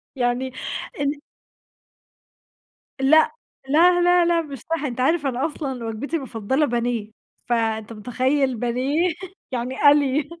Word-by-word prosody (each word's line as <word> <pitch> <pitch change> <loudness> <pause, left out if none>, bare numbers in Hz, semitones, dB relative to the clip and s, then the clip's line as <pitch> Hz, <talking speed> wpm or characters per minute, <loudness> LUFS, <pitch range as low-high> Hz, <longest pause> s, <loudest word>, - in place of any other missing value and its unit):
يعني 250 +1 -1 0.5
إن 285 0 +1 1.9
لأ، 315 +10 +4 0.3
لا 350 +4 +5
لا 355 0 +4
لأ 340 -1 +2
مش 280 -4 -8
صح، 325 +5 -3
أنت 255 -2 -4
عارف 305 +2 +2
أنا 260 +1 0
أصلًا 270 -6 -4
وجبتي 225 +9 -4
المفضلة 265 0 -1
بانيه 235 -4 -2 0.3
فأنت 225 -2 -1
متخيّل 255 +4 0
بانيه 265 +9 0 0.4
يعني 250 +1 -3
قَلْي، 290 0 +4
265 Hz, 115 wpm, -22 LUFS, 240-305 Hz, 1.9 s, لا